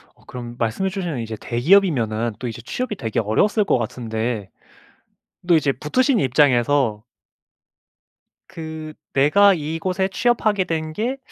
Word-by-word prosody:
어 - - -25
그럼 120 -1 -8
말씀해 120 +13 -1
주신 180 -6 -4
이제 115 -1 -5
대기업이면은 120 - +2
또 125 - -4
이제 115 0 -6
취업이 230 - -4
되게 115 - -2
어려웠을 200 - +2
것 130 - +2
같은데 110 -2 -3 1.0
또 170 -2 +5
이제 145 -3 +2
붙으신 245 - +1
입장에서 130 -4 +2 1.5
그 160 -3 -7 0.2
"내가 195 +9 +5
이곳에 170 +4 -2
취업하게 215 -1 +1
된 160 -2 -3
게 240 +7 -2
150 Hz, 285 characters per minute, -21 LUFS, 120-190 Hz, 1.5 s, 또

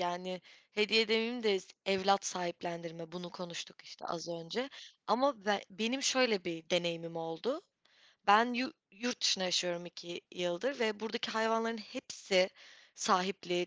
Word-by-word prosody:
yani, 180 +1 -3 0.3
hediye 215 +1 +5
demeyeyim 225 +2 +2
de 205 -3 +4 0.3
evlat 195 0 +3
sahiplendirme, 170 -2 -5
bunu 175 -1 -7
konuştuk, 175 -2 -8
işte, - - -13
az 170 0 -5
önce. 170 +9 -4 0.4
Ama 230 0 +2
be 205 -1 +2
benim 225 +8 -1
şöyle 250 -7 +4
bir 165 -1 -6
deneyimim 170 -2 0
oldu. 165 - -3 0.6
Ben 225 +4 +7
yu 260 +5 -1 0.2
yurt 240 +4 -3
dışında 190 - +5
yaşıyorum 175 -1 +1
2 175 0 -9
yıldır 180 +10 -1
ve 215 -2 +1
buradaki 230 +2 -3
hayvanların 225 +1 +1
hepsi 200 -5 0 0.4
sahipli, 180 -3 +1
195 Hz, 130 wpm, -34 LUFS, 175-225 Hz, 0.6 s, Ben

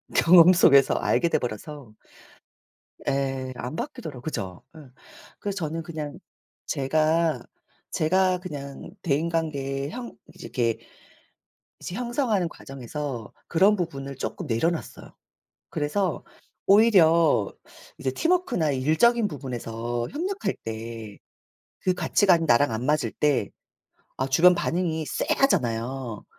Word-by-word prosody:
경험 175 +1 +7
속에서 140 -6 +6
알게 170 - +1
돼 - - +2
버려서 125 +2 -6 1.2
예 135 -1 -1
안 125 +4 -5
바뀌더라고 160 - -6
그죠. 95 - -5
예. - - -11 0.6
그래서 200 -1 -3
저는 165 -1 -3
그냥 155 -3 -6 0.5
제가, 155 0 +1 0.5
제가 185 +3 +2
그냥 145 -5 -8
대인관계에 145 -4 -1
형 240 +5 -7 0.2
이렇게 120 -9 -1 1.0
이제 175 - -6
형성하는 240 -6 0
과정에서 135 -5 -7
그런 195 +5 +4
부분을 140 -7 -4
쪼끔 165 +6 -5
내려 125 +6 +1
놨어요. 170 - -7 0.6
그래서 170 +3 -1 0.4
오히려 170 - +5 0.5
이제 130 - -2
팀워크나 335 - +1
일적인 160 - +3
부분에서 120 - -4
협력할 375 +6 -2
때 110 -1 -7 0.6
그 185 - +2
가치관이 180 -2 +3
나랑 125 -1 +4
안 110 +3 -3
맞을 150 +2 +1
때 145 -9 +1 0.7
아 130 - 0
주변 180 +6 +6
반응이 165 -2 -1
쎄하잖아요. 125 - 0
155 Hz, 250 characters per minute, -25 LUFS, 130-180 Hz, 1.2 s, 경험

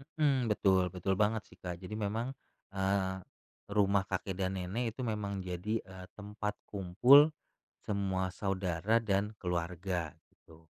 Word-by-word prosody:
Mhm, 135 -7 +2
betul 95 -3 +3
betul 95 +2 -1
banget, 105 +2 +2
sih, - - -18
Kak. 90 -1 -5
Jadi 95 +3 -6
memang, 110 +5 -2 0.4
eee, 95 -1 +1 0.5
rumah 100 -1 +3
kakek 95 0 -3
dan 95 -1 0
nenek 115 +7 -2
itu 130 - -7
memang 100 -2 -2
jadi, 90 +5 -2
eee, 95 -1 -11
tempat 105 0 -4
kumpul 120 - +6 0.5
semua 95 -2 0
saudara 95 +1 0
dan 105 -1 0
keluarga, 90 -1 -2 0.2
gitu. 80 0 -19
100 Hz, 135 wpm, -32 LUFS, 95-105 Hz, 0.5 s, kumpul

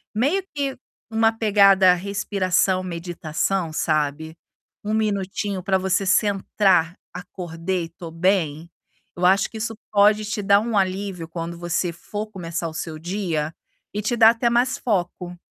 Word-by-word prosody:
meio 290 - +1
que 280 -2 -2 0.3
uma 225 0 +3
pegada 200 -4 +5
respiração, 190 -1 0
meditação, 170 0 -2
sabe. 155 0 -1 0.5
1 210 +1 -2
minutinho 200 -2 -1
pra 190 +1 +2
você 190 +1 0
centrar: 190 -3 +2 0.2
"Acordei, 175 -1 -4
tô 170 0 -10
bem!". 165 -2 0 0.5
Eu 180 - -1
acho 195 +2 +4
que 225 - -9
isso 225 +1 -3 0.2
pode 210 +1 +4
te 210 0 -3
dar 200 0 +5
um 225 -1 -1
alívio, 190 -2 -1
quando 170 0 -6
você 175 +1 -1
for 205 +5 -6
começar 170 -5 -4
o - - -11
seu 160 0 -5
dia 165 -3 -2 0.4
e 210 - -2
te 215 +3 -1
dá 225 -1 +8
até 235 +1 0
mais 245 +2 +2
foco. 180 -4 -2
190 Hz, 145 wpm, -23 LUFS, 170-210 Hz, 0.5 s, dá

